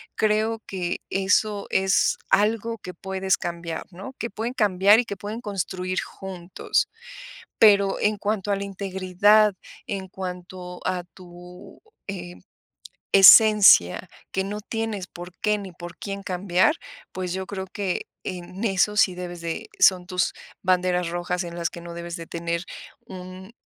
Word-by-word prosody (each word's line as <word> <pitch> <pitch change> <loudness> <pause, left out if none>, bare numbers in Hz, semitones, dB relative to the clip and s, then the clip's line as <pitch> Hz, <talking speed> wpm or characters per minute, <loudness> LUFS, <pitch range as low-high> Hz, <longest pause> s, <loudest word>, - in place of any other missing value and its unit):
Creo 220 +1 +1
que 180 -3 -3
eso 200 +2 +1
es 190 0 +2
algo, 225 +2 +2
que 180 -2 -8
puedes 190 +1 -1
cambiar, 170 -2 -5
¿no? 190 +9 -9
Que 235 - -3
pueden 230 +4 -4
cambiar, 205 -2 +4
y 245 - 0
que 200 - -5
pueden 210 +4 -6
construir 185 -3 -3
juntos. 185 -2 -3 0.7
Pero, 200 -3 +5
en 210 0 +2
cuanto 205 -1 -2
a - - +2
la 200 - -4
integridad, 200 +2 +3 0.3
en 195 -5 -4
cuanto 180 -1 -7
a 180 -1 -1
tu, 180 0 -13 0.3
eh, 175 -2 -6 0.8
esencia, 195 - +8 0.2
que 190 - 0
no 205 +2 -4
tienes 220 -3 -4
por 175 0 -10
qué, 210 0 +2
ni 195 -2 -8
por 175 0 -10
quién, 200 -1 -5
cambiar. 185 - +2 0.4
Pues 185 -1 -4
yo 190 +1 -4
creo, 190 -1 -5
que 195 -2 -3 0.2
en 185 +3 -6
eso 210 0 +2
sí, 190 -4 +4
debes 175 -1 -7
de 165 -1 -4
Son 180 -2 +5
tus 180 0 0 0.3
banderas 180 -1 +1
rojas, 175 +1 -2
en 170 -1 -7
las 170 0 -1
que 170 - -9
no 170 0 -8
debes 170 0 -6
de 165 - -8
tener 170 +1 -3 0.4
un 185 +2 -10
190 Hz, 150 wpm, -24 LUFS, 180-205 Hz, 0.8 s, esencia